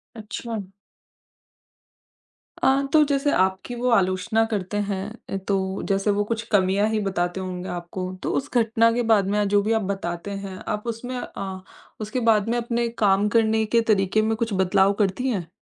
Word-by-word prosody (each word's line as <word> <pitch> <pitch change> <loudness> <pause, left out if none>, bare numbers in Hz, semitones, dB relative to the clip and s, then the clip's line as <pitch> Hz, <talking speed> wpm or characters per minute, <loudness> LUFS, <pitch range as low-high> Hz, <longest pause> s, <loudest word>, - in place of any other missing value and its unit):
अच्छा। 215 -2 -6 1.9
अ, 270 +1 +3
तो 305 - +7
जैसे 285 +1 +1
आपकी 190 +5 0
वो 245 +1 0
आलोचना 195 +1 +2
करते 205 -1 -2
हैं 195 -1 -2 0.2
अ, 195 - -2
तो 190 -1 -1
जैसे 195 +1 +2
वो 205 - +2
कुछ 225 0 0
कमियाँ 200 +1 +3
ही 220 -1 0
बताते 185 -2 -1
होंगे 185 -1 -5
आपको, 180 +1 -5
तो - - -1
उस 275 - -3
घटना 230 -1 +3
के 245 - 0
बाद 200 -3 +4
में 205 0 +1
जो 205 0 +3
भी 215 - -1
आप 220 - +1
बताते 175 0 -4
हैं 190 -1 -7 0.2
आप 210 +3 -5
उसमें 240 +3 -4
अ, 190 -5 -6 0.4
उसके 215 +4 -2
बाद 215 +1 +1
में 240 - +1
अपने 235 0 -1 0.2
काम 200 +1 +4
करने 220 0 +2
के 230 +2 +2
तरीके 195 +1 +2
में 220 +1 +1
कुछ 225 -2 -2
बदलाव 190 +1 +3
करती 200 +7 -1
हैं? 180 -8 -3
205 Hz, 175 wpm, -24 LUFS, 190-230 Hz, 1.9 s, तो